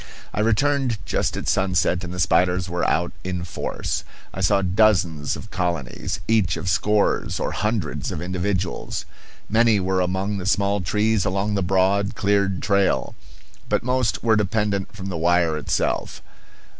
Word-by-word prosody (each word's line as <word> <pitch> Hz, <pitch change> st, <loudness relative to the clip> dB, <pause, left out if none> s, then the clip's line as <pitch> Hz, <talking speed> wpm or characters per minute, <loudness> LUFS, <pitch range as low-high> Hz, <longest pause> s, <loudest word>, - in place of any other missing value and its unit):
I -, -, -3 dB
returned 125 Hz, +3 st, +2 dB
just -, -, -1 dB
at -, -, -5 dB
sunset 90 Hz, -1 st, +1 dB
and 90 Hz, -, -5 dB
the 90 Hz, -, -6 dB
spiders 90 Hz, -1 st, +2 dB
were 90 Hz, +1 st, -2 dB
out 85 Hz, +1 st, 0 dB
in 90 Hz, -1 st, -3 dB
force. 90 Hz, -, -3 dB, 0.3 s
I -, -, -5 dB
saw 100 Hz, -, +3 dB
dozens 90 Hz, -6 st, +2 dB
of 105 Hz, -, -10 dB
colonies, 85 Hz, -8 st, -2 dB
each 105 Hz, -8 st, +2 dB
of 85 Hz, +3 st, -5 dB
scores 105 Hz, +5 st, +1 dB
or -, -, -1 dB
hundreds 105 Hz, -7 st, -2 dB
of -, -, -4 dB
individuals. 90 Hz, +1 st, -2 dB, 0.4 s
Many 110 Hz, -1 st, +4 dB
were 95 Hz, 0 st, 0 dB
among 95 Hz, +3 st, -1 dB
the 95 Hz, -, -4 dB
small 100 Hz, -1 st, +1 dB
trees 105 Hz, +3 st, +1 dB
alongside 100 Hz, +2 st, 0 dB
the -, -, +1 dB
broad, 95 Hz, +2 st, +1 dB
cleared 100 Hz, -2 st, +1 dB
trail. 100 Hz, -2 st, +1 dB, 0.6 s
But -, -, +1 dB
most 125 Hz, -2 st, 0 dB
were 115 Hz, -1 st, +4 dB
dependent 105 Hz, -1 st, 0 dB
from 95 Hz, -1 st, -6 dB
the 90 Hz, -, -3 dB
wire 85 Hz, -1 st, +2 dB
itself. 75 Hz, -, -2 dB
95 Hz, 155 wpm, -23 LUFS, 90-105 Hz, 0.6 s, Many